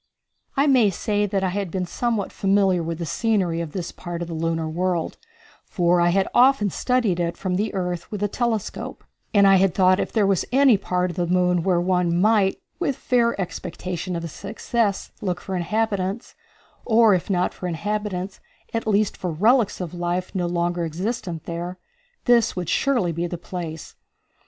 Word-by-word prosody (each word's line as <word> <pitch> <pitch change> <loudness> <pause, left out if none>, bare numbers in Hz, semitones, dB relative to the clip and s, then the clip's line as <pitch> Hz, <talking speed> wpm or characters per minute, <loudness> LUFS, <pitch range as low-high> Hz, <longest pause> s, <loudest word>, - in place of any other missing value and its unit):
I 275 - +4
may 255 -7 +5
say 205 +2 -1
that 195 -1 -1
I 190 - +1
had 195 0 -2
been 185 +1 -2
somewhat 225 +2 -2
familiar 195 -2 +2
with 165 0 -3
the 170 - -4
scenery 185 -4 0
of 165 -3 -5
this 175 +1 -4
part 175 -1 -6
of - - -6
the 170 - -6
lunar 165 0 -1
world, 175 +1 -2 0.4
for 175 -3 +2
I 175 - +4
had 190 +2 +2
often 245 -5 +4
studied 235 -7 +1
it 170 -1 -1
from 185 -2 -2
the 205 +4 0
earth 180 -2 -3
with 210 -1 -3
a - - +3
telescope, 225 0 -3 0.3
and 200 -2 +5
I 195 0 +7
had 190 -1 +2
thought 185 -1 +5
that - - 0
if - - -3
there 215 -3 +2
was 195 -3 +2
any 265 -2 +6
part 180 -2 -1
of - - -11
the 175 -1 0
moon 180 0 +2
where 180 0 +2
one 175 -1 +1
might, 205 -1 +3 0.2
with 275 - 0
fair 235 -4 +1
expectation 180 0 -4
of 170 0 -3
success, 215 +1 -2
look 180 -3 -2
for 190 +1 -5
inhabitants, 200 +3 -1 0.5
or 225 -2 +5
if 180 +1 -1
not 180 -2 +1
for 180 - -5
inhabitants, 200 +1 -3 0.3
at 230 -1 -2
least 210 -1 +2
for 180 - -4
relics 215 +7 +2
of 180 -3 -5
life 175 +1 -2
no 180 -2 -1
longer 175 0 -1
existent 175 0 -3
there, 175 +2 -5 0.5
this 235 -2 +4
would 180 -3 -3
surely 245 -11 +1
be 170 +2 -2
the 175 - -5
place. 165 -2 -7
185 Hz, 185 wpm, -23 LUFS, 175-210 Hz, 0.5 s, I